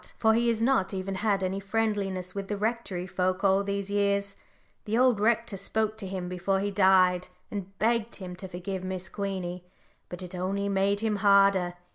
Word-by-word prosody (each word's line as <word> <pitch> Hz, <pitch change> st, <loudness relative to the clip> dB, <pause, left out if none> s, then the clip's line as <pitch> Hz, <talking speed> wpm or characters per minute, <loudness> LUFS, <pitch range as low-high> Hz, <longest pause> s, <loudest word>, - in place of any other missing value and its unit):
For 220 Hz, -1 st, +4 dB
he 235 Hz, +1 st, +2 dB
has 225 Hz, -1 st, +1 dB
not 230 Hz, -7 st, +2 dB
even 190 Hz, +1 st, -3 dB
had 200 Hz, 0 st, 0 dB
any 190 Hz, +1 st, -1 dB
friendliness 195 Hz, -3 st, -1 dB
with 200 Hz, -1 st, -4 dB
the 205 Hz, -, -2 dB
Rectory 210 Hz, -4 st, -2 dB
folk 185 Hz, +1 st, -1 dB
all 195 Hz, 0 st, +4 dB
these 200 Hz, 0 st, -3 dB
years; 200 Hz, 0 st, +1 dB, 0.5 s
the 215 Hz, +2 st, 0 dB
old 250 Hz, -4 st, +4 dB
rector 225 Hz, -1 st, +1 dB
spoke 215 Hz, +2 st, -1 dB
to 195 Hz, -, -4 dB
him 185 Hz, -1 st, -4 dB
before 180 Hz, +2 st, 0 dB
he 205 Hz, +1 st, -1 dB
died, 185 Hz, -2 st, +4 dB, 0.2 s
and 195 Hz, -1 st, -6 dB
begged 230 Hz, 0 st, +1 dB
him 180 Hz, -2 st, -7 dB
to 190 Hz, -, -7 dB
forgive 185 Hz, +1 st, -5 dB
Miss 185 Hz, 0 st, -4 dB
Queenie, 185 Hz, -3 st, -4 dB, 0.5 s
but 180 Hz, +1 st, -7 dB
it 180 Hz, 0 st, -8 dB
only 195 Hz, +2 st, -2 dB
made 200 Hz, +1 st, +1 dB
him 220 Hz, -2 st, 0 dB
harder. 195 Hz, -3 st, +4 dB
195 Hz, 185 wpm, -28 LUFS, 185-210 Hz, 0.5 s, For